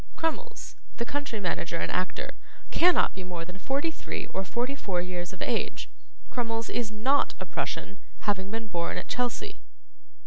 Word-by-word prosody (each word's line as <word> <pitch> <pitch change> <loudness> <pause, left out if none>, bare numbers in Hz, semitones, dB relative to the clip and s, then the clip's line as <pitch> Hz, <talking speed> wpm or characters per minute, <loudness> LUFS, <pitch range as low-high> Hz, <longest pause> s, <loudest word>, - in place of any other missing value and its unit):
Crummles, 460 +9 -1 0.2
the 235 - +1
country 285 -4 -1
manager 170 -3 0
and - - 0
actor, 185 0 0 0.4
cannot 355 +1 +6
be 190 - -5
more 175 -2 -3
than 180 +2 -8
forty 280 +9 +1
three, - - -3
or 190 - +1
forty 240 +8 0
four 195 -10 0
years 175 0 -2
of 185 - -4
age. - - 0 0.4
Crummles 230 -2 0
is 235 -3 +1
NOT 255 +7 +4
a - - -2
Prussian, - - -2 0.2
having 195 -2 +1
been 225 +1 -2
born 170 -5 0
at - - -3
Chelsea." 250 - 0
220 Hz, 165 wpm, -30 LUFS, 185-270 Hz, 0.4 s, cannot